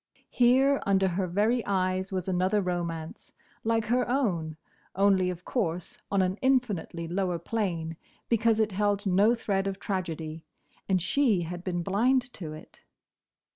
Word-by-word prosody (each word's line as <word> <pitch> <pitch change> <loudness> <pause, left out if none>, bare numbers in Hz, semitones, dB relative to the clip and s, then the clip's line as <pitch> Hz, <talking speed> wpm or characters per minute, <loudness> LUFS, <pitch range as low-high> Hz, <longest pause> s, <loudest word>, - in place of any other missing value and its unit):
Here, 265 +3 +4
under 195 -1 +2
her 185 +1 -1
very 215 +7 +1
eyes, 185 -1 0
was 185 -1 -3
another 185 +3 +1
romance, 170 -4 -4 0.3
like 225 0 +1
her 245 +2 +1
own—only, 185 - 0
of 180 0 -6
course, 180 -8 -2
on 195 -1 +2
an 185 +2 -1
infinitely 215 -11 0
lower 180 0 -1
plane, 170 -4 -2 0.3
because 230 -1 +2
it 215 -1 +2
held 205 +1 0
no 200 +5 +4
thread 195 -4 -1
of 195 -1 -3
tragedy—and 165 0 -4
she 225 -3 +2
had 175 +1 -6
been 175 -2 -2
blind 245 +6 +1
to 160 -5 -7
it. 155 0 -12
190 Hz, 135 wpm, -28 LUFS, 175-220 Hz, 0.3 s, Here